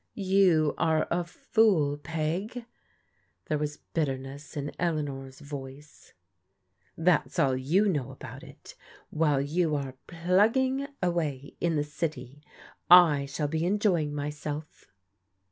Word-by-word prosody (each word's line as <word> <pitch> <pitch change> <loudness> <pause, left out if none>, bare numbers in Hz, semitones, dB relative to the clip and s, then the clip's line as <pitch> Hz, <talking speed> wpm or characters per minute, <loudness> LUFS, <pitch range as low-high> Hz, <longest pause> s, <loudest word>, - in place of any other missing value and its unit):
*' - - -52
You 185 -6 +3
are 160 -2 +2
a 175 +1 +1
fool, 170 -4 +2
Peg." 170 +10 -3 0.8
There 150 - -1
was 150 0 -3 0.2
bitterness 140 -1 -3
in 145 +1 -3
Elea 165 -3 0
nor's 135 -2 -7
voice. 140 0 -10 0.4
" 90 -2 -43
That's 175 -4 +2
all 135 -2 +3
you 160 +11 +2
know 145 -10 -1
about - - -10
it. - - -13 0.4
While 150 -3 +2
you 155 +2 0
are 135 -2 -3
* - - -47
plug 180 +6 +2
ging 265 +1 0
' - - -10
away 155 -6 -1
in 170 -2 +1
the 145 - +1
city, 145 -3 -5 0.5
I 160 -6 +7
shall 145 +2 -2
be 160 +2 -1
enjoying 180 -5 +1
myself." 150 +1 -5
155 Hz, 140 wpm, -28 LUFS, 145-175 Hz, 0.8 s, I